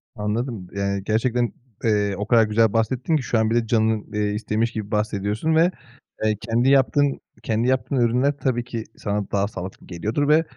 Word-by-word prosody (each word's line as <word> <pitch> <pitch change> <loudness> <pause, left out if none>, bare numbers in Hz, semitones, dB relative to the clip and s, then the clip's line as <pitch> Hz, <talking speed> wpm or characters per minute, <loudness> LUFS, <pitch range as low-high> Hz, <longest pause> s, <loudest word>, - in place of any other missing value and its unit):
Anladım, 105 -1 -3
yani, 100 0 -1
gerçekten, 120 +3 0 0.3
eee, 105 -2 +2
o 105 - -3
kadar 115 -1 +5
güzel 110 0 +2
bahsettin 125 +7 +1
ki 145 - 0
şu 120 - 0
an 110 0 +2
bile 115 0 +1
canın, 110 -1 +1
eee, 105 0 0
istemiş 110 +2 -1
gibi 110 -2 -5
bahsediyorsun 105 +7 0
ve, 170 +3 +4 0.5
eee, 110 0 +2
kendi 120 +3 +1
yaptığın, 140 +1 +3 0.2
kendi 115 +2 0
yaptığın 130 +1 0
ürünler 125 +4 +2
tabii 125 -4 0
ki 115 -2 -5
sana 105 -1 -3
daha 100 0 +1
sağlıklı 95 -2 -8
geliyordur 110 +11 -1
ve, 155 +2 +5
110 Hz, 175 wpm, -23 LUFS, 105-125 Hz, 0.5 s, kadar